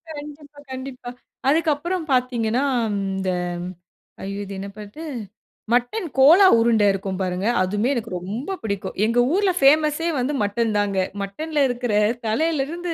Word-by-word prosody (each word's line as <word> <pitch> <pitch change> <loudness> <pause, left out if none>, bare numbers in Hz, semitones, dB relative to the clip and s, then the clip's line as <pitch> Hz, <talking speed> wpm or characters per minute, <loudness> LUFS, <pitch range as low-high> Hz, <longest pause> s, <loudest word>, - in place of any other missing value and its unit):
கண்டிப்பா, 290 0 -10
கண்டிப்பா. 260 -1 -7 0.4
அதுக்கு 315 +4 +3
அப்புறம் 345 +3 -3
பார்த்தீங்கனா, 250 -1 +1 0.3
இந்த 195 -1 -2 0.9
ஐயோ! 200 +1 -4
இது 200 - -8
என்ன 195 - -5
பாட்டு? 210 +9 -9 0.7
மட்டன் 250 - 0
கோலா 330 +9 +8
உருண்ட 230 -2 +3
இருக்கும் 195 -1 -4
பாருங்க. 185 +2 -1
அதுமே 205 +6 0
எனக்கு 235 -4 -4
ரொம்ப 225 - -4
பிடிக்கும். 200 -3 -4
எங்க 230 +2 +2
ஊர்ல 395 0 +3
பேமஸ்யே 305 +3 +4
வந்து 255 +4 -1
மட்டன் 215 +2 0
தாங்க. 205 -1 0 0.2
மட்டன்ல 295 +10 -2
இருக்கிற 245 -1 -2 0.3
தலையில் 300 +6 +1
இருந்து, 340 +3 -4
245 Hz, 135 wpm, -22 LUFS, 205-300 Hz, 0.9 s, கோலா